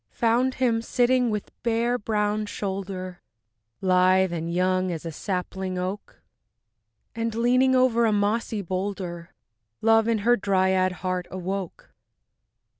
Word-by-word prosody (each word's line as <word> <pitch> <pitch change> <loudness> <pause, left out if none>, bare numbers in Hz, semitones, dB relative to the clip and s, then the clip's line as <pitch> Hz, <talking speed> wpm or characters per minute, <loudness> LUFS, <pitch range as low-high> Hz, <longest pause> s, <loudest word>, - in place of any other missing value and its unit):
Found 240 +3 +1
him 235 -3 +1
sitting 245 +1 +2
with 210 -2 -4
bare 235 +1 0
brown 210 0 -1
shoulder, 190 -3 -5 0.6
Lithe 185 0 +3
and 165 0 -3
young 185 +1 +1
as 165 -1 -5
a 165 - -4
sapling 185 +2 -4
oak, 185 +3 -5 0.9
And 230 -1 -3
leaning 255 +3 +3
over 245 -2 +3
a - - +2
mossy 210 +1 0
boulder, 185 -2 -4 0.4
Love 225 0 +4
in 230 -1 +2
her 240 +1 +6
dryad 190 -2 +2
heart 185 -1 -2
awoke. 185 0 -5
200 Hz, 120 wpm, -25 LUFS, 185-230 Hz, 0.9 s, her